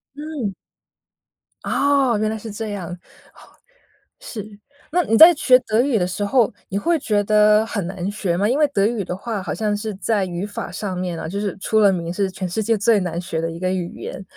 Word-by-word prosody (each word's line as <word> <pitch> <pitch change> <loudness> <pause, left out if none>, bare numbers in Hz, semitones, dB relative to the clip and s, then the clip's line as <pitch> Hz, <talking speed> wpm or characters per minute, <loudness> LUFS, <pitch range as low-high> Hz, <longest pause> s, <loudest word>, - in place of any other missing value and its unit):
嗯。 290 -8 -4 1.1
哦， 275 -4 +2
原 215 0 0
来 220 - -3
是 220 +1 -8
这 215 +1 -5
样， 190 -5 -5 0.4
哦， - - -20 0.8
是。 215 - -9 0.3
那 355 +3 +3
你 225 - +2
在 335 +6 +10
学 255 -3 +5
德 220 0 +1
语 265 -3 +1
的 180 - +1
时 180 +3 -3
候， 230 0 +2 0.2
你 195 - -2
会 335 +10 +1
觉 210 -6 0
得 210 +1 +4
很 205 -5 -3
难 190 0 -4
学 185 -4 -2
吗？ 200 +3 +2
因 255 - +1
为 300 - +5
德 200 -7 +1
语 220 -2 0
的 180 - -4
话 210 +1 -4
好 - - -3
像 210 -2 -1
是 215 +1 -4
在 205 0 0
语 175 +1 -4
法 205 - -6
上 195 -3 -4
面 180 -2 -3
呢， 160 - -5
就 200 +4 -3
是 205 -2 -3
出 220 +3 +1
了 205 -2 +6
名 170 -1 -3
是 195 +1 0
全 185 0 -4
世 200 +6 -2
界 225 +1 +1
最 215 +1 +3
难 170 -2 -3
学 165 -2 -3
的 165 - -2
一 165 - -8
个 185 0 -1
语 180 -2 -3
言。 190 - -6
205 Hz, 240 characters per minute, -21 LUFS, 185-225 Hz, 1.1 s, 在